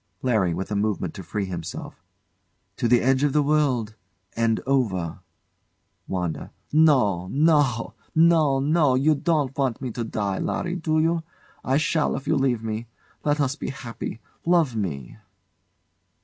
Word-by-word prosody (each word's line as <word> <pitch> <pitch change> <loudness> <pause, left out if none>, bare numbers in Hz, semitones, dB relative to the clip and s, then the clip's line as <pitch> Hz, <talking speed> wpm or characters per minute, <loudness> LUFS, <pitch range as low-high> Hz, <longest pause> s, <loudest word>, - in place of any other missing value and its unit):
LARRY. 105 -9 +2
[With 95 +4 -5
a - - 0
movement 100 -5 -1
to - - -8
free 100 +4 -3
'himself] 85 -3 -7 0.7
To - - +1
the 120 0 +4
edge 130 +1 +2
of 145 -2 +2
the 150 - +3
world 140 -7 +1 0.4
and 115 -1 +1
over! 100 -12 0 0.9
WANDA. 90 -4 -3 0.2
No, 125 - +4
no! 140 - +2 0.2
No, 160 -4 +4
no! 145 -1 +3
You 145 +4 +3
don't 145 -3 0
want 130 -5 0
me 130 -2 -4
to 120 +1 -4
die, 100 -3 -2
Larry, 180 -1 -2
do 155 -2 0
you? 165 +1 +2 0.4
I 135 +2 +2
shall 155 0 +1
if 135 - -6
you - - +2
leave 130 -5 +1
me. 110 +1 -4 0.4
Let 145 0 +1
us 140 -1 +1
be - - -5
happy! 115 -3 -6 0.2
Love 165 -8 +2
me! 75 - -4
130 Hz, 150 wpm, -24 LUFS, 105-150 Hz, 0.9 s, the